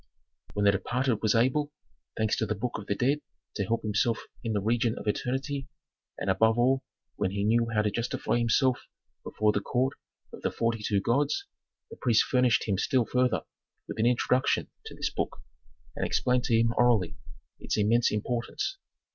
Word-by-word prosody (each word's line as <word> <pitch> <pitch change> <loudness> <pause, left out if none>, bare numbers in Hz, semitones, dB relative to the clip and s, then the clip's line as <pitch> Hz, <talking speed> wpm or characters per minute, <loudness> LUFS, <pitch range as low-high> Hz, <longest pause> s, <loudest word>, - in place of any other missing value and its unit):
When 105 0 +1
the 100 - +7
departed 120 +4 0
was 110 -1 +2
able, 130 +6 +2 0.5
thanks 110 -1 +1
to 110 - 0
the 110 - -1
Book 115 +2 -3
of 100 - -10
the 100 - 0
Dead 140 +6 +1 0.3
to 100 - -1
help 115 +4 -1
himself 110 +2 0 0.2
in 115 - -1
the 105 - +1
region 115 +3 +1
of - - -7
eternity, 135 +5 -2 0.5
and - - -4
above 110 +4 +3
all 130 +2 +3 0.4
when 100 -2 0
he 100 +1 -2
knew 115 +2 +3
how 105 -2 +2
to 105 - 0
justify 120 +2 -1
himself 120 +2 +2 0.4
before 105 0 +1
the 105 - 0
court 130 +6 0 0.4
of - - -9
the - - 0
forty 115 -1 -1
two 100 -1 +1
gods, 145 - +1 0.5
the - - -9
priests 115 -3 +3
furnished 125 -4 +2
him 100 -3 0
still 130 -2 +2
further 125 0 +1 0.5
with - - -6
an 115 - +3
introduction 125 +1 +1 0.2
to - - -9
this - - -2
book, - - -3 0.6
and - - -3
explained 125 -1 +1
to 115 - +2
him 115 +1 +2
orally 115 -8 +3 0.4
its - - -2
immense 115 +3 +3
importance. 120 - -2
115 Hz, 180 wpm, -28 LUFS, 105-125 Hz, 0.6 s, the